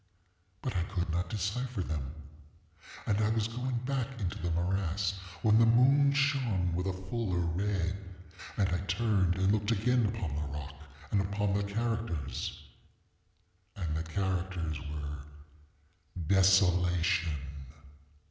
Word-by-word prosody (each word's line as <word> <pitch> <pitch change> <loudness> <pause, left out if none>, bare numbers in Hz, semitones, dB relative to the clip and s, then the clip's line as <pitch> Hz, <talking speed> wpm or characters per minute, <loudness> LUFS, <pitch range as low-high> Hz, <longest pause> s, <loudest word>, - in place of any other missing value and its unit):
But 125 - -2
I 90 - +2
could 90 -3 -2
not 90 +2 -1
decypher 105 +2 -2
them. 75 -3 -4 0.9
And 105 0 +1
I 110 0 +3
was 110 -1 +1
going 125 +2 -2
back 130 -2 -2
into 90 -5 -2
the 85 - -2
morass, 90 +2 0 0.3
when 110 -1 +6
the 115 - +7
moon 135 +5 +6
shone 130 -11 +1
with 90 +2 -1
a - - +1 0.2
fuller 105 -4 -1
red, 90 +2 0 0.6
and 100 - +3
I 90 -1 0
turned 95 -2 +2
and 95 +1 +2
looked 105 0 +1
again 115 +1 +3
upon 105 -8 -3
the 75 0 -2
rock, 75 0 -7 0.4
and 100 - +3
upon 100 +1 0
the 100 - +2
characters, 105 - -2 1.1
and 85 -6 -2
the 80 - -1
characters 90 -2 -2
were 75 -1 -5 1.1
DESOLATION. 90 -3 +4
95 Hz, 130 wpm, -31 LUFS, 85-110 Hz, 1.1 s, the